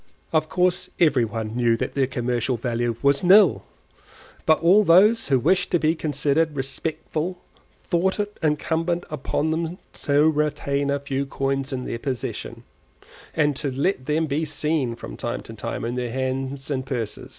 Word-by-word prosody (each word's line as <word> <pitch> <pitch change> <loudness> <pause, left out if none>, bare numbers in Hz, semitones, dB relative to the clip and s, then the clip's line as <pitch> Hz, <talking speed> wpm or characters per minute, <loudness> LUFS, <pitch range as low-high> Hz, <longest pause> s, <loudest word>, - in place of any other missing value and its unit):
Of 155 0 +2
course 180 +1 +1
every 150 -8 +4
one 110 0 -5
knew 120 -2 +2
that - - -3
their 135 -2 +1
commercial 125 0 -1
value 120 0 -1
was 140 +4 +3
nil, 190 0 +6 0.9
but 155 -1 +5
all 190 +5 +6
those 210 +6 +5
who 135 - +3
wished 180 +8 +2
to 175 - +2
be 155 0 +2
considered 150 0 0
respectable 155 +5 -3 0.5
thought 190 +4 0
it 205 0 -2
incumbent 165 +3 0
upon 150 +1 -1
them 165 +2 -2 0.2
to 145 +2 +2
retain 145 -2 0
a 140 0 +1
few 140 0 -3
coins 135 0 -2
in 125 -1 -3
their 115 - -4
possession, 130 -1 -5 0.7
and 150 -2 +2
to 145 - -2
let 135 +1 -1
them 155 +2 +1
be 150 +1 -1
seen 150 -4 -1
from - - -9
time - - -3
to - - -11
time - - -4
in 120 - -2
their 125 -1 -3
hands 130 +2 -3
and 130 -2 -1
purses. 115 -5 -4
145 Hz, 165 wpm, -23 LUFS, 130-160 Hz, 0.9 s, nil